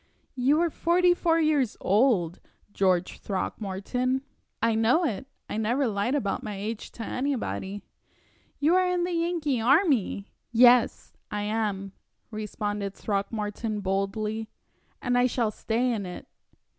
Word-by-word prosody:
"You 270 +4 +3
are 340 -1 +1
forty 350 +3 +3
four 330 -2 +2
years 300 -7 +2
old, 195 -5 +2 0.3
George 185 -2 +1
Throckmorton." 215 +7 -2 0.4
"I 230 0 +2
know 230 +10 +3
it. 265 -1 -3 0.2
I - - -4
never 240 +6 +1
lied 215 +4 0
about 205 -9 -1
my 210 -1 -5
age 210 +3 -5
to 230 - -6
anybody." 225 -7 -3 0.8
"You 305 +4 +3
are 370 0 +4
in 360 -1 +1
the 355 - -1
Yankee 335 -7 0
army!" 260 - +2 0.2
"Yes, 240 0 +5 0.2
I 210 0 -3
am," 205 -2 -2 0.4
responded 210 -2 -3
Throckmorton, 210 +1 -2
boldly, 210 +3 -2 0.5
"and 245 -1 +1
I 250 - +4
shall 235 -3 0
stay 235 +4 0
in 200 -4 -3
it." 180 - -8
225 Hz, 130 wpm, -27 LUFS, 205-275 Hz, 0.8 s, Yes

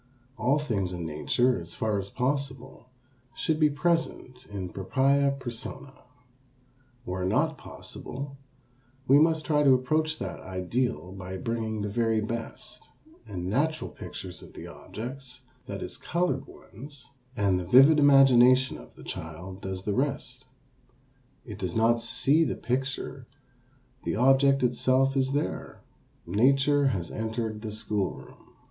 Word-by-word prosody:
All 125 +5 +2
things 100 -11 -1
in 85 -2 -4
nature, 105 +9 +1
as 85 0 -10
far 110 -2 0
as 100 0 -4
possible, 130 -1 -3 0.5
should 155 -1 0
be 155 -1 +5
present 145 -5 -1
in 95 -3 -5
propria 140 +9 +2
persona. 130 +2 -6 1.1
Where 90 -3 -3
not 145 - +1
possible, 140 +2 -8 0.7
we 140 +2 +7
must 160 0 +3
try 150 -2 +2
to 135 -3 +6
approach 155 +5 0
that - - -5
ideal 95 - -2
by 95 0 -6
bringing 110 0 -2
the 105 - -2
very 115 +1 +1
best, 115 +1 -5 0.5
and 90 -2 -5
natural 155 +10 0
pictures 90 -2 -7
of - - -13
the - - -9
objects, 130 +3 -8 0.3
that - - -5
is - - -6
colored 165 -6 -1
ones, 135 +3 -10 0.3
and 100 -2 +2
the 90 - -5
vivid 135 - +7
imagination 130 -2 +6
of - - -15
the - - -13
child 90 +4 -7
does 95 -1 -5
the 105 - -1
rest. 130 0 -2 1.0
It 105 -5 -8
does 90 -2 -3
not 115 +1 +3
see 140 +6 +3
the - - -1
picture, 130 +2 -3 0.8
the - - -1
object 135 +3 +4
itself 130 +2 +2
is 135 0 +1
there, 145 - -3 0.4
nature 135 +8 +3
has 95 -10 -2
entered 110 -1 -3
the 110 -1 -5
school 105 -2 -1
room. - - -16
125 Hz, 140 wpm, -28 LUFS, 105-140 Hz, 1.1 s, we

